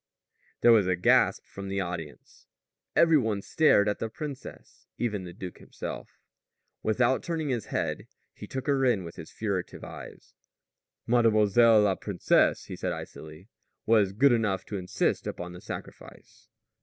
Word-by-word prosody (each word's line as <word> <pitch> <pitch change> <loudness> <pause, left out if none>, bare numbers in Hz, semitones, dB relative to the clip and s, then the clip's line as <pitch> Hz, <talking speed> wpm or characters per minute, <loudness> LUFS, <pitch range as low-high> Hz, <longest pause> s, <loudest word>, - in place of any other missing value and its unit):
There 120 - +7
was 105 -5 +5
a 90 - +2
gasp 90 - +3
from 100 0 -8
the 100 0 -2
audience. 85 -7 -7 0.5
Every 165 -2 +5
one 110 -5 -1
stared 150 -10 +4
at 105 - -1
the 115 - -3
princess. 140 +2 -9
Even 105 -6 -2
the 90 - -8
duke 90 0 -9
himself. - - -8 0.6
Without 120 +4 +2
turning 160 -3 -3
his 120 -5 -2
head - - -3 0.3
he - - -10
took 130 -1 -5
her 140 -2 +1
in 120 -7 +2
with 85 -1 -10
his 80 - -9
furtive 100 -5 -4
eyes. - - -11 0.7
"Mlle. 115 -2 +3 0.5
la 100 -2 +3
Princess," 95 -1 +1
he - - -7
said - - -3
icily, 80 +5 -9 0.4
"was 105 -4 +4
good 135 +7 +4
enough 105 -6 0
to 105 - -6
insist 95 +1 -1
upon 90 0 -6
the 90 - -11
sacrifice." - - -10
105 Hz, 155 wpm, -28 LUFS, 95-120 Hz, 0.7 s, There